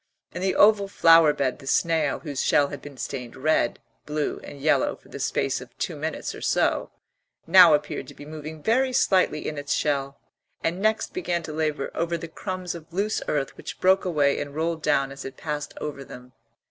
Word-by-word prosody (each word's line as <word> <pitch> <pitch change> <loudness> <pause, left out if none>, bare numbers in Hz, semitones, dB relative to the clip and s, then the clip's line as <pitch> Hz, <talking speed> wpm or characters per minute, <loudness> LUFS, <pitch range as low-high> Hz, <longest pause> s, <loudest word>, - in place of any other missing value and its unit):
In - - -5
the 190 0 0
oval 205 -1 +5
flower 165 -5 +6
bed 135 -3 -1
the 135 - -12
snail, 160 -1 +1
whose 145 -4 -3
shell 140 -1 +3
had 145 -2 -7
been 145 -2 -11
stained 125 -2 -6
red, 130 -3 +1 0.3
blue, 150 0 -2
and 145 - -10
yellow 155 +3 +2
for - - -22
the - - -8
space - - -1
of - - -14
two - - -3
minutes - - -4
or - - -10
so, - - +1 0.6
now 170 -2 +8
appeared 150 0 -4
to - - -12
be 145 - -11
moving 155 0 -8
very 255 +3 +2
slightly 185 -9 +2
in 150 -1 -4
its 145 0 -1
shell, 140 -2 -1 0.4
and 175 +3 -1
next 220 +1 +1
began 175 -1 -2
to 155 - -6
labour 155 -2 -2
over 170 +1 -1
the 165 - -7
crumbs 185 +1 -5
of 165 -1 -11
loose 205 +5 -1
earth 145 -2 -1
which - - -8
broke 190 +1 +4
away 150 -6 +1
and 145 0 -6
rolled 165 +1 -1
down 140 -3 +1
as 135 0 -8
it 135 0 -8
passed 150 -2 -4
over 145 -2 -5
them. 125 -1 -12
155 Hz, 200 wpm, -25 LUFS, 145-175 Hz, 0.6 s, now